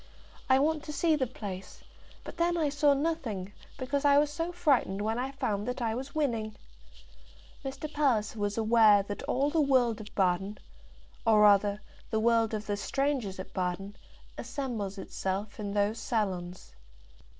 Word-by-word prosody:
I 260 - +6
want 300 +2 +1
to 300 - -5
see 315 +2 +2
the 265 -4 0
place; 200 -6 -8 0.4
but - - -9
then 345 +1 +1
I 310 -3 +1
saw 285 0 +3
nothing, 260 - -2 0.2
because 275 +2 -2
I 285 -1 +5
was 295 0 +3
so 330 +2 -2
frightened 280 - +1
when 220 +2 -1
I 260 +2 -2
found 210 -6 -2
that 250 +1 -3
I 230 -2 0
was 265 +5 -6
winning." 230 -8 -1 1.1
Mr. 270 +2 -5
Palliser 230 -7 +1
was 205 0 -1
aware 220 -2 +5
that 205 +1 -6
all 280 +3 +1
the 320 0 +2
world 250 -6 +2
of 210 - -12
Baden, 190 +2 +1 0.7
or 220 -2 +5
rather 205 0 +5 0.3
the 220 - 0
world 225 -1 +2
of 210 0 -5
the 205 -1 -2
strangers 260 -2 -1
at 185 - -8
Baden, 185 +2 -3 0.4
assembles 220 -8 -4
itself 195 +2 -4
in 205 -1 -4
those 205 +2 +1
salons. 185 - -3
225 Hz, 160 wpm, -30 LUFS, 205-280 Hz, 1.1 s, I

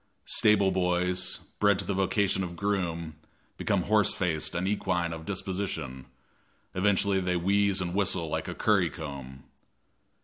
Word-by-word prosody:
Stable 105 -4 +4
boys, 90 0 0 0.2
bred 100 -1 +4
to - - -2
the 100 - -1
vocation 95 0 +1
of 85 -2 -5
groom, 85 -5 -2 0.4
become 100 -4 0
horse 105 -2 +3
faced 85 -4 -1
and 90 +2 -1
equine 90 -4 0
of 80 0 -8
disposition, 90 -9 -4 0.7
eventually 100 0 +2
they 90 -1 0
wheeze 100 +2 +2
and 90 -1 -3
whistle 95 -4 0
like - - -3
a - - -5
curry - - +2
comb. 70 -3 -8
90 Hz, 140 wpm, -28 LUFS, 85-100 Hz, 0.7 s, Stable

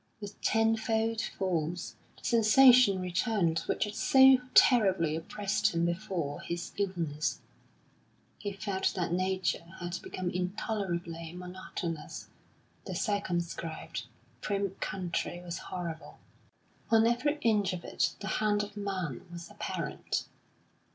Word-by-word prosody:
With 205 -1 -9
tenfold 225 0 +1
force 175 -4 -2 0.2
the - - -19
sensation 240 -2 +6
returned 180 -2 +1
which - - +1
had 210 -1 -4
so 265 +4 +7 0.2
terribly 190 -10 +5
oppressed 205 +5 -1
him 170 0 +2
before 170 -4 -2
his 175 +1 -4
illness; 160 -9 -1 1.0
he 205 - -3
felt 195 -1 -1
that 175 -2 -1
Nature 185 -1 0 0.2
had 175 0 -4
become 185 -1 -4
intolerably 180 -3 -3
monotonous; 180 -2 -6 0.6
the - - -4
circumscribed, 170 - -2 0.3
prim 200 -2 -1
country 175 -1 -3
was 175 -1 -5
horrible. 170 -3 -6 0.7
On 225 -1 +5
every 250 +6 +2
inch 210 -4 +2
of 180 -2 -5
it - - 0
the - - -4
hand 210 -1 +2
of 205 0 -8
man 190 - -4
was 170 -1 -8
apparent. - - -3
185 Hz, 115 wpm, -30 LUFS, 170-210 Hz, 1.0 s, so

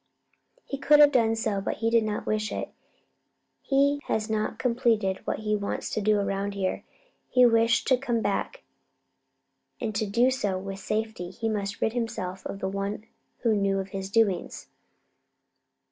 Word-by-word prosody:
"He 275 - -5
could 295 +1 +5
have 295 -1 +8
done 225 -4 +3
so, 215 -3 -1
but - - -2
he 225 +1 -1
did 230 -1 +4
not 215 -1 -3
wish 215 0 -1
it. - - -4 0.9
He 280 +1 +2
has 220 0 -1
not 215 -1 -1
completed 225 -6 +1
what - - -2
he 210 0 0
wants 200 -1 -3
to 215 - -1
do 210 +1 +3
around 200 0 -2
here. 190 -2 -2 0.5
He 250 -1 +5
wished 230 -1 +3
to 260 - +5
come 240 -3 0
back, 205 -2 -2 1.2
and 225 -3 -3
to 210 +1 -1
do 240 +6 +3
so 205 -7 -1
with 195 +1 -6
safety 215 -3 -3
he 225 +4 -4
must 200 -2 -3
rid 220 - +1
himself 190 -6 -3
of - - -6
the 190 - -1
one 200 +2 -3 0.4
who 230 -2 +3
knew 195 -1 +1
of 195 0 -3
his 195 -1 -5
doings." 200 -3 0
215 Hz, 170 wpm, -27 LUFS, 195-230 Hz, 1.2 s, have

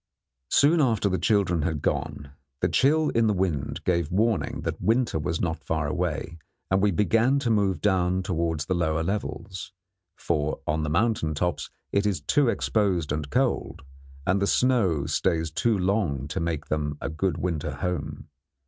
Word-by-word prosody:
Soon 155 +3 +4
after 115 -6 +2
the 95 - 0
children 100 -7 +2
had 75 -2 -2
gone, 70 -1 -2 0.3
the - - +2
chill 155 +3 +3
in 115 -1 +2
the 105 - +2
wind 85 -7 -2
gave 85 -4 +1
warning 100 -5 0
that - - -4
winter 115 -6 +1
was 80 +2 -2
not 80 -2 -2
far 80 -1 -1
away, 85 0 -3 0.3
and 95 0 +3
we 105 - +4
began 115 +8 +2
to 130 -4 0
move 100 -6 +1
down 95 -2 +1
towards 85 -4 -1
the 95 - -1
lower 80 -2 0
levels; 95 -1 -4 0.4
for 75 -2 -1
on 75 +1 0
the 75 - -2
mountain 85 -3 +1
tops 90 +3 -2 0.2
it 100 +1 +2
is 95 -6 0
too 140 - +2
exposed 95 -10 0
and 75 -1 -2
cold, 130 - -1 0.4
and 95 +2 +2
the 100 - +2
snow 100 - +2
stays 80 +1 0
too 110 +6 +1
long 90 - 0
to - - -3
make 80 -2 -2
them 75 -1 -2
a - - -4
good 80 +2 -1
winter 85 -4 -2
home. 75 -5 -4
90 Hz, 170 wpm, -26 LUFS, 80-105 Hz, 0.4 s, Soon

